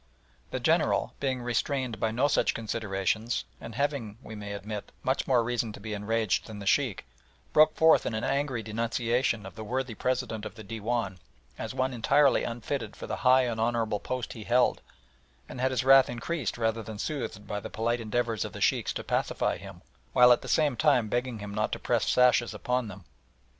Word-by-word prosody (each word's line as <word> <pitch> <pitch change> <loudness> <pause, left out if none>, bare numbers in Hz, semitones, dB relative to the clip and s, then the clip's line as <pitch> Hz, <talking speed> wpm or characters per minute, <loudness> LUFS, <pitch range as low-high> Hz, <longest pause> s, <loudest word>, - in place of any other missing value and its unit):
The - - -3
General, - - +2
being 130 -3 -1
restrained 120 -1 -1
by 110 - +1
no 120 +6 +2
such - - +2
considerations, 110 0 -1
and 115 -2 -9
having, 130 -6 -2
we 110 - -9
may 105 -1 -6
admit, 105 +1 -6
much 130 - 0
more 125 -3 +4
reason 120 -1 -1
to - - -10
be 110 +1 -5
enraged 105 0 0
than 110 -2 -8
the 100 - -7
Sheikh, 120 -1 +1 0.5
broke 155 0 +6
forth 160 0 +5
in 110 - -2
an 110 - -2
angry 135 -4 -1
denunciation 115 0 0
of 95 - -9
the 110 - -8
worthy 125 +2 -2
President 115 -2 -2
of - - -7
the 110 - -10
Dewan 110 -2 -3 0.4
as 110 +3 -5
one 130 0 0
entirely 140 +4 +3
unfitted 115 -1 -4
for - - -8
the - - -4
high 130 0 +5
and 115 -3 -2
honourable 115 -2 0
post 130 +3 -4
he 110 - -8
held, 125 +1 +3 0.7
and 125 - -7
had 130 - +3
his 130 -2 0
wrath 135 0 +7
increased 125 +4 -3
rather 115 -1 0
than 110 -1 -8
soothed 125 -5 -4
by 105 0 -3
the - - -7
polite 115 +2 -1
endeavours 115 -1 -1
of - - -6
the - - -7
Sheikhs - - +2
to - - -5
pacify - - 0
him, - - -11 0.3
while 125 0 +7
at 120 - +5
the - - -9
same 150 -5 +2
time 125 -6 +3
begging 120 0 -1
him 105 -1 -7
not 110 +1 -1
to - - -1
press - - +1
the - - -1
sashes 125 -3 +4
upon 125 +2 -1
them. 100 -3 -10
115 Hz, 200 wpm, -28 LUFS, 110-130 Hz, 0.7 s, wrath